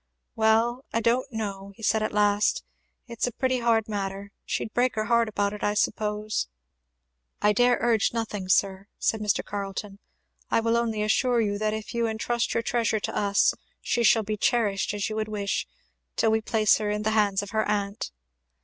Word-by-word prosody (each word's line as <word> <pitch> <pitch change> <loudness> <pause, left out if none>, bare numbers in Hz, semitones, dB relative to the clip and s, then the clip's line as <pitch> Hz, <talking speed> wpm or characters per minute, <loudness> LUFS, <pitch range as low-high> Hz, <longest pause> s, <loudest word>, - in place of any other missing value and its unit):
"Well, 225 +3 +2
I 230 - +1
don't 240 +4 +1
know! 200 -3 -4
" - - -33
he 225 - -14
said 220 0 +2
at 215 - -1
last, 205 0 +2 0.4
"it's 235 -1 -2
a - - -2
pretty 255 +1 0
hard 230 -2 +2
matter 200 -1 -4
she'd 220 - -3
break 250 +1 +1
her 215 0 -1
heart 235 0 +2
about 205 -1 -1
it, 210 - -7
I 205 - +1
suppose, 210 - -1 0.4
" - - -50
"I 210 0 +5
dare 245 +3 +4
urge 225 -3 +2
nothing, 215 -5 -4
sir," 195 +1 +2
said 220 - 0
Mr. 210 -2 0
Carleton. 200 0 -5 0.5
"I - - +3
will 230 0 +1
only 225 -2 0
assure 240 +3 +2
you 205 -2 0
that 215 0 0
if 220 +2 -7
you 235 -1 +1
entrust 235 +2 -1
your 230 - +1
treasure 230 -2 0
to - - -4
us 200 -1 +3 0.3
she 240 - -1
shall 225 -1 +5
be 210 +1 -3
cherished 210 -4 +1
as 205 - -1
you 215 - -4
would 215 -1 -1
wish, 205 -2 -2 0.5
till 225 - +2
we 220 0 +2
place 215 -2 +3
her 210 -1 -1
in 210 0 -1
the 220 - +1
hands 205 -2 +2
of 205 - -8
her 220 0 +1
aunt." 200 0 -2
215 Hz, 200 wpm, -26 LUFS, 205-230 Hz, 0.5 s, I